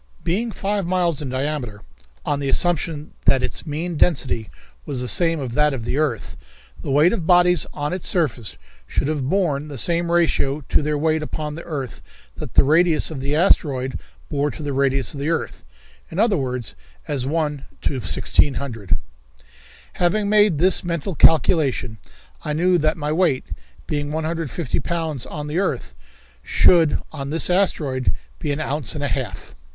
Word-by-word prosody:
Being 220 Hz, +7 st, -1 dB
five 200 Hz, -2 st, -2 dB
miles 175 Hz, -4 st, +1 dB
in 140 Hz, -, -4 dB
diameter, 130 Hz, -5 st, -3 dB, 0.4 s
on 145 Hz, -, 0 dB
the 140 Hz, -1 st, -2 dB
assumption 160 Hz, -1 st, 0 dB
that 135 Hz, -, +4 dB
its -, -, -3 dB
mean 160 Hz, +3 st, -3 dB
density 130 Hz, -9 st, +1 dB, 0.3 s
was 140 Hz, -4 st, -4 dB
the 125 Hz, -, -2 dB
same 165 Hz, +3 st, +2 dB
as 130 Hz, -4 st, -4 dB
that 150 Hz, +3 st, +2 dB
of 115 Hz, -3 st, -6 dB
the 135 Hz, -, -1 dB
earth, 140 Hz, -8 st, -1 dB, 0.5 s
the -, -, -6 dB
weight 150 Hz, +7 st, +4 dB
of 175 Hz, -8 st, -3 dB
bodies 180 Hz, -2 st, +5 dB
on 145 Hz, +2 st, -3 dB
its 185 Hz, -, -3 dB
surface 120 Hz, -, 0 dB, 0.3 s
should -, -, -1 dB
have 145 Hz, -4 st, -1 dB
borne 155 Hz, -7 st, 0 dB
the 145 Hz, -2 st, -7 dB
same 170 Hz, +5 st, +1 dB
ratio 155 Hz, -4 st, +2 dB
to -, -, +3 dB
their 150 Hz, 0 st, -1 dB
weight 155 Hz, +1 st, +1 dB
upon 150 Hz, 0 st, -4 dB
the 165 Hz, -, -7 dB
earth 140 Hz, -6 st, -5 dB, 0.4 s
that -, -, -7 dB
the -, -, +7 dB
radius 160 Hz, +3 st, +3 dB
of 150 Hz, -, -5 dB
the 140 Hz, +3 st, -1 dB
asteroid 140 Hz, -6 st, +2 dB, 0.3 s
bore 145 Hz, 0 st, 0 dB
to 155 Hz, -, -7 dB
the 145 Hz, -1 st, -2 dB
radius 135 Hz, 0 st, +1 dB
of 140 Hz, -, -7 dB
the 145 Hz, +3 st, -1 dB
earth; 165 Hz, -, -2 dB, 0.5 s
in -, -, -8 dB
other 215 Hz, 0 st, +3 dB
words, 125 Hz, -, -3 dB, 0.3 s
as 130 Hz, -3 st, -2 dB
1 150 Hz, -2 st, -1 dB, 0.2 s
to -, -, -1 dB
1,600. 125 Hz, -6 st, +1 dB, 1.0 s
Having 200 Hz, +4 st, +1 dB
made 210 Hz, -5 st, +4 dB
this 180 Hz, +4 st, +3 dB
mental 170 Hz, +1 st, -2 dB
calculation, 150 Hz, -8 st, +3 dB, 0.4 s
I 150 Hz, -, -2 dB
knew 175 Hz, +3 st, +3 dB
that 155 Hz, +1 st, +1 dB
my 150 Hz, -1 st, -2 dB
weight, 155 Hz, -5 st, +2 dB, 0.4 s
being 145 Hz, -1 st, -2 dB
150 160 Hz, -5 st, -2 dB
pounds 160 Hz, -6 st, -3 dB
on 150 Hz, -1 st, -6 dB
the 150 Hz, +4 st, -1 dB
earth, 130 Hz, -, -2 dB, 0.5 s
should 165 Hz, -, +4 dB
on 140 Hz, -3 st, -5 dB
this 165 Hz, +4 st, +1 dB
asteroid 150 Hz, -9 st, +1 dB, 0.3 s
be -, -, -2 dB
an 145 Hz, -, -2 dB
ounce 145 Hz, -6 st, -2 dB
and 145 Hz, -, -3 dB
a -, -, +1 dB
half. 125 Hz, -11 st, -4 dB
150 Hz, 170 wpm, -22 LUFS, 135-170 Hz, 1.0 s, the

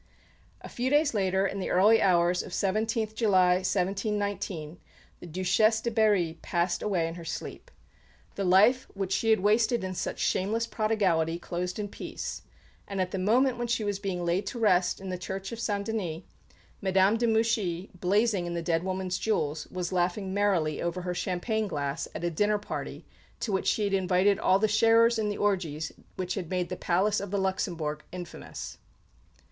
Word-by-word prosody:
A -, -, -8 dB
few 250 Hz, +2 st, -2 dB
days 295 Hz, 0 st, +3 dB
later, 190 Hz, -2 st, +1 dB
in 195 Hz, -, -2 dB
the 190 Hz, -, -3 dB
early 215 Hz, +5 st, +5 dB
hours 175 Hz, -1 st, +3 dB
of 180 Hz, -, -9 dB
17th 215 Hz, +3 st, 0 dB
July, 185 Hz, -5 st, +4 dB
1719, 195 Hz, -3 st, -2 dB, 0.4 s
the -, -, -10 dB
Duchesse 185 Hz, +6 st, +2 dB
de 235 Hz, -, -2 dB
Berry 205 Hz, -7 st, +2 dB
passed 175 Hz, 0 st, -1 dB
away 180 Hz, -6 st, 0 dB
in 165 Hz, -, -5 dB
her 170 Hz, 0 st, -9 dB
sleep. 165 Hz, -, -6 dB, 0.6 s
The 200 Hz, -, -3 dB
life 210 Hz, +8 st, +4 dB
which 195 Hz, -1 st, -3 dB
she 225 Hz, -, +1 dB
had 220 Hz, -4 st, +4 dB
wasted 220 Hz, +3 st, +2 dB
with 185 Hz, 0 st, -4 dB
such -, -, -3 dB
shameless 220 Hz, +5 st, 0 dB
prodigality 195 Hz, -8 st, +1 dB
closed 180 Hz, +1 st, -4 dB
in 210 Hz, -1 st, -3 dB
peace; -, -, -6 dB, 0.5 s
and 200 Hz, -1 st, -4 dB
at 185 Hz, -1 st, 0 dB
the 190 Hz, -, -2 dB
moment 240 Hz, +6 st, +2 dB
when 240 Hz, -, -1 dB
she 230 Hz, -2 st, 0 dB
was 205 Hz, -1 st, -2 dB
being 185 Hz, -3 st, -3 dB
laid 175 Hz, +4 st, 0 dB
to -, -, -4 dB
rest 185 Hz, -6 st, +2 dB
in 190 Hz, 0 st, -7 dB
the 180 Hz, -1 st, -4 dB
Church 190 Hz, +1 st, -5 dB
of 230 Hz, -, -6 dB
St 205 Hz, -3 st, -1 dB
Denis, 185 Hz, -7 st, -3 dB, 0.6 s
Madame 190 Hz, +2 st, +3 dB
de 235 Hz, +1 st, +1 dB
Mouchy, 220 Hz, -5 st, 0 dB
blazing 200 Hz, 0 st, +1 dB
in 170 Hz, -, -3 dB
the 170 Hz, -, -3 dB
dead 165 Hz, -1 st, +1 dB
woman's 185 Hz, 0 st, -2 dB
jewels, 155 Hz, -8 st, -1 dB
was 180 Hz, 0 st, -4 dB
laughing 185 Hz, +2 st, 0 dB
merrily 190 Hz, -7 st, +1 dB
over 170 Hz, +1 st, -2 dB
her 180 Hz, 0 st, -2 dB
champagne 185 Hz, +5 st, -1 dB
glass 145 Hz, -4 st, -3 dB
at -, -, -5 dB
a 175 Hz, -, 0 dB
dinner 210 Hz, +5 st, +2 dB
party 205 Hz, -, -6 dB, 0.3 s
to 220 Hz, -, -2 dB
which 190 Hz, -, 0 dB
she 215 Hz, -, +2 dB
had 200 Hz, -1 st, 0 dB
invited 190 Hz, +1 st, +3 dB
all 190 Hz, -, +4 dB
the 215 Hz, +2 st, +2 dB
sharers 225 Hz, +2 st, +4 dB
in 210 Hz, -1 st, 0 dB
the 205 Hz, -, -3 dB
orgies 165 Hz, -7 st, -1 dB, 0.2 s
which 185 Hz, -1 st, -3 dB
had 180 Hz, -5 st, -5 dB
made 180 Hz, -1 st, -1 dB
the 180 Hz, -, -3 dB
Palace 195 Hz, +5 st, +1 dB
of 200 Hz, -, -5 dB
the 200 Hz, -, -1 dB
Luxembourg 170 Hz, -6 st, -2 dB
infamous! 180 Hz, -2 st, -8 dB
190 Hz, 185 wpm, -28 LUFS, 180-215 Hz, 0.6 s, early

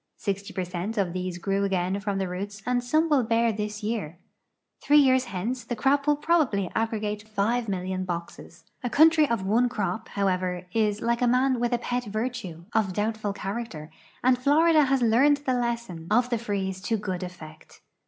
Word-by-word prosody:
Sixty 200 Hz, 0 st, -3 dB
per 185 Hz, -, -2 dB
cent 180 Hz, +5 st, -4 dB
of 185 Hz, -4 st, 0 dB
these 185 Hz, -1 st, -3 dB
grew 195 Hz, +2 st, -1 dB
again 190 Hz, 0 st, 0 dB
from 200 Hz, -1 st, -2 dB
the 190 Hz, -1 st, -1 dB
roots 200 Hz, +3 st, -6 dB
and 245 Hz, -1 st, 0 dB
some 310 Hz, +6 st, +2 dB
will 295 Hz, -4 st, +3 dB
bear 230 Hz, 0 st, +2 dB
this 210 Hz, +1 st, -4 dB
year. 205 Hz, -7 st, -3 dB, 0.6 s
Three 295 Hz, -, +4 dB
years 260 Hz, -2 st, +5 dB
hence 235 Hz, +5 st, -3 dB
the 240 Hz, -, -4 dB
crop 280 Hz, +5 st, +1 dB
will 295 Hz, -, +5 dB
probably 290 Hz, -, +1 dB
aggregate 210 Hz, -2 st, -2 dB
5,000,000 200 Hz, -4 st, -1 dB
boxes. 170 Hz, -1 st, -7 dB, 0.2 s
A 245 Hz, -, -1 dB
country 310 Hz, +4 st, +5 dB
of 230 Hz, -5 st, -1 dB
one 235 Hz, +5 st, +3 dB
crop, 220 Hz, 0 st, -3 dB
however, 185 Hz, -2 st, -1 dB
is, 215 Hz, -2 st, +1 dB
like 235 Hz, +1 st, 0 dB
a 245 Hz, -, +3 dB
man 255 Hz, +1 st, +2 dB
with 240 Hz, 0 st, 0 dB
a 240 Hz, -, +2 dB, 0.2 s
i>et 245 Hz, 0 st, 0 dB
virtue, 215 Hz, -6 st, -4 dB
of 200 Hz, -4 st, +1 dB
doul)tful 210 Hz, 0 st, -2 dB
character, 195 Hz, -6 st, -5 dB, 0.3 s
and 250 Hz, 0 st, +4 dB
Florida 305 Hz, +3 st, +4 dB
has 265 Hz, -1 st, +1 dB
learned 260 Hz, +6 st, +4 dB
the 260 Hz, -, +1 dB
lesson 235 Hz, -9 st, -3 dB
of 245 Hz, +3 st, +2 dB
the 235 Hz, -, +1 dB
freeze 195 Hz, -4 st, -3 dB
to 225 Hz, +3 st, 0 dB
good 185 Hz, -3 st, -4 dB
effect. 160 Hz, -4 st, -10 dB
215 Hz, 185 wpm, -26 LUFS, 190-245 Hz, 0.6 s, years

